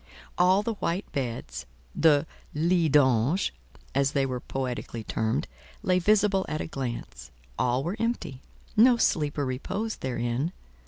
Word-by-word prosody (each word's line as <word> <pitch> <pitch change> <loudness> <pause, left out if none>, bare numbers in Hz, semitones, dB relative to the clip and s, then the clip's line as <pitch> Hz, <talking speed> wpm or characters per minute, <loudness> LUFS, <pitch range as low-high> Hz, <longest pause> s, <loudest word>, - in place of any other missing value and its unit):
All 185 +3 +4
the 230 - -1
white 190 -2 -2
beds—the 135 - 0 0.3
"lits 165 +1 +2
d'ange," 135 - +3 0.4
as 140 +1 +2
they 140 -1 +2
were 130 -2 -3
poetically 125 -3 -4
termed—lay 110 - -2
visible 200 0 +3
at 155 - -2
a - - -2
glance; 115 - -5 0.3
all 125 +2 +1
were 175 +7 -3
empty: 230 - -2 0.3
no 240 +3 +6
sleeper 150 -8 +1
reposed 195 - -3
therein. 125 +5 -1
145 Hz, 120 wpm, -27 LUFS, 125-185 Hz, 0.4 s, no